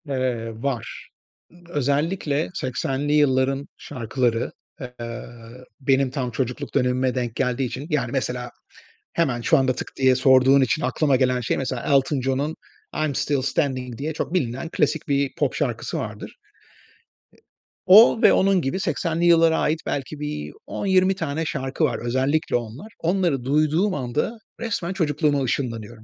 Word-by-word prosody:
Eee, 125 -4 -1
var. 135 -5 -4 0.4
Iıı, 175 0 -20
özellikle 145 +1 0
80'li 135 -2 -2
yılların 135 -1 +2
şarkıları, 120 -1 -2 0.3
eee, 130 - -5 0.9
benim 135 -1 +2
tam 130 -2 -3
çocukluk 125 0 -3
dönemime 125 +1 +1
denk 120 -3 -2
geldiği 130 0 0
için...Yani, 145 +5 -2
mesela 125 -2 -2 0.6
hemen 135 -8 0
şu - - +4
anda 130 -1 +2
tık - - -6
diye 130 -1 +4
sorduğun 130 +1 +5
için 120 -4 +1
aklıma 135 +3 +1
gelen 125 -1 +1
şey, 115 - -1
mesela: 130 -2 -3
Elton 135 0 +2
John'un 135 +4 -1 0.5
"I'm 145 -3 -2
Still 140 0 0
Standing" 130 -4 -1
diye 155 +3 -3
çok 155 - -4
bilinen 135 -2 -1
klasik 150 -1 0
bir 140 -1 +1
pop - - 0
şarkısı - - -2
vardır. - - -6
E - - -34 1.3
o 220 +4 +8
ve - - +7
onun 195 -1 +3
gibi 135 +5 -2
80'li 170 -3 -1
yıllara 165 -1 +5
ait 155 +1 +1
belki 145 +2 -4
bir 110 - -4 0.2
10-20 190 -1 +2
tane 165 -3 -3
şarkı 135 +1 -2
var, 130 -6 +1
özellikle 135 +6 0
onlar. 120 - -5
Onları 170 -6 0
duyduğum 155 +8 +2
anda 145 - -2 0.2
resmen 205 -6 -2
çocukluğuma 150 -4 +1
ışınlanıyorum. 115 -3 -3
135 Hz, 145 wpm, -23 LUFS, 125-155 Hz, 1.3 s, o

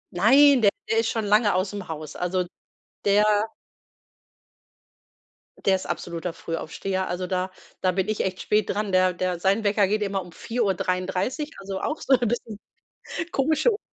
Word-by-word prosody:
Nein, 270 +8 +6
der 205 - +6 0.2
der 225 - +3
ist 225 - +1
schon 225 -2 -1
lange 205 -1 +4
aus'm 190 +1 -2
Haus. 155 -2 -7
Also, 180 +1 -1 0.6
der 205 +1 +4 2.4
Der 195 - +5
ist 185 - -8
absoluter 170 0 -4
Frühaufsteher. 185 +4 -3
Also 180 +1 -3
da 185 0 -1 0.3
da 185 - +3
bin 190 +2 -1
ich 215 - 0
echt 190 -1 -3
spät 210 0 +1
dran. 205 0 -1
Der 185 0 +4
der 180 0 -2
sein 195 +4 +2
Wecker 205 -1 +3
geht 210 +2 0
immer 200 -1 -1
um 180 -1 -11
4:33, 200 - -1
also 195 -1 -5
auch 305 - -3
so 270 - +2
'n 245 -1 0
bisschen 220 -2 -3 0.7
komische 310 - +2
Uhrzeit. 415 - -3
195 Hz, 160 wpm, -25 LUFS, 185-220 Hz, 2.4 s, Nein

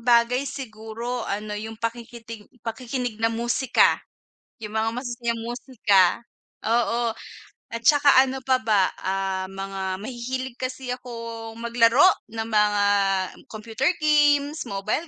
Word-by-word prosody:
bagay 240 +3 +3
siguro 230 -1 -5
ano, 210 +1 -3
'yung 220 +2 -5
pakikitig 230 -1 -6 0.2
pakikinig 235 0 -4
ng 225 - +3
musika, 240 +2 +2 0.6
'yung 210 -1 -7
mga 220 +1 +1
masasayang 240 -2 -3
musika, 230 -6 +2 0.4
oo. 235 +1 +1 0.6
At 230 0 -4
saka 290 -1 +6
ano 265 0 -3
pa 260 -1 +4
ba? 205 -4 +3
Ah, 190 0 -2
mga 195 -1 -4
mahihilig 255 +1 -4
kasi 255 0 -4
akong 230 -2 -8
maglaro 235 +4 +4 0.3
ng 225 0 -4
mga 210 -2 +3 0.7
computer 225 +5 -1
games, 295 0 +3
mobile 215 +11 -2
230 Hz, 115 wpm, -24 LUFS, 215-250 Hz, 0.7 s, saka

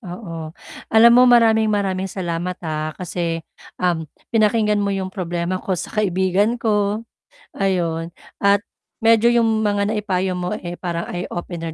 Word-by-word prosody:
Oo. 175 -5 -7 0.4
Alam 230 +2 +7
mo 250 - +7
maraming 225 -2 +5
maraming 195 -2 -1
salamat 175 -1 -3
ha 155 0 -2
kasi, 170 -2 -3 0.3
um, 175 -3 0 0.3
pinakinggan 215 -1 +2
mo 200 - 0
'yong 190 -1 -3
problema 175 0 -3
ko 185 - -2
sa 175 - -6
kaibigan 195 +3 +1
ko, 210 0 0 0.5
ayun. 170 -4 -1 0.3
At 200 0 +3 0.4
medyo 230 0 +5
'yong 225 -2 +2
mga 205 0 +1
naipayo 190 -4 -1
mo 180 +3 -2
eh, 175 -2 -7
parang 170 -2 -3
eye-opener 175 -2 -5
190 Hz, 140 wpm, -21 LUFS, 175-210 Hz, 0.5 s, Alam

